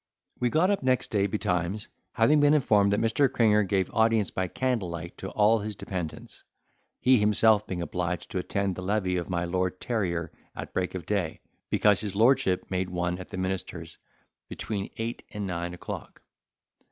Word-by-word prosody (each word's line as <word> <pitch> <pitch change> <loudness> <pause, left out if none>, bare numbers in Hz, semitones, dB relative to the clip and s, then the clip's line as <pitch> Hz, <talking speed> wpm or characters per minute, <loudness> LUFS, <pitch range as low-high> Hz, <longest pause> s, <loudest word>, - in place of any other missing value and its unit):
We 125 - +2
got 170 +9 +3
up 200 - 0
next 130 -1 +1
day 100 -2 +2
betimes, 95 0 -1 0.3
having 125 +6 +4
been 145 +1 +5
informed 105 -8 +3
that 105 - +2
Mr. 115 +5 +2
Cringer 105 -2 +4
gave 95 -2 0
audience 110 -2 +2
by 95 -1 -1
candle 120 -3 -1
light 85 0 -6
to 95 - -5
all 110 +2 +3
his 105 0 -5
dependents, 95 -5 -6 0.6
he 130 -1 +5
himself 105 0 +3
being 90 -2 -3
obliged 90 0 -3
to 95 - -1
attend 100 +1 -1
the - - -6
levee 95 -1 0
of 85 - -4
my 85 -1 -1
Lord 90 +1 -1
Terrier 85 -9 -2 0.2
at - - -7
break 90 0 -1
of 90 -4 -5
day, 95 -5 -1 0.3
because 105 -1 +3
his 100 -3 -4
lordship 110 -5 +3
made 95 0 -1
one 90 0 -2
at 95 - -9
the - - -6
minister's 90 -3 -4 0.5
between 100 -3 -4
eight 115 +1 -3
and 105 -1 -3
nine 85 -1 -3
o'clock. - - -8
100 Hz, 175 wpm, -27 LUFS, 90-110 Hz, 0.6 s, been